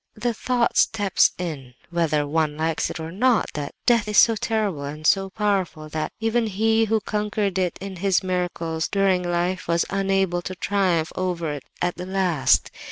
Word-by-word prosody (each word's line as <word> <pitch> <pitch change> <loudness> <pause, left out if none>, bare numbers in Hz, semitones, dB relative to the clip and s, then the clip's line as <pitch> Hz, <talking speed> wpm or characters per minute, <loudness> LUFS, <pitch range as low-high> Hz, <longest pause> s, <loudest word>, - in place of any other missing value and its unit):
"The 240 +2 -1
thought 240 +1 0
steps 205 -4 +3
in, 140 -8 -6 0.2
whether 160 -4 +1
one 150 0 0
likes 160 0 0
it - - -6
or 160 +1 -5
no, 235 +5 +3
that 145 -1 -5
death 230 -3 +3
is 210 -1 0
so 230 - +7
terrible 210 -9 -1
and 150 +2 -7
so 195 +3 +3
powerful, 190 -7 -1
that 155 0 -3
even 225 +1 +1
He 220 +2 +2
who 220 0 +1
conquered 210 -3 -1
it 180 -2 -1
in 195 -1 -7
His 195 +1 +1
miracles 175 -3 -2
during 195 -2 +2
life 175 +1 -1
was 170 0 +2
unable 195 -2 +1
to 185 +1 -6
triumph 180 -4 0
over 175 -4 -2
it 145 -2 -7 0.2
at 175 0 -1
the 180 +1 -6
last. 185 -7 +2
185 Hz, 175 wpm, -23 LUFS, 165-205 Hz, 0.2 s, so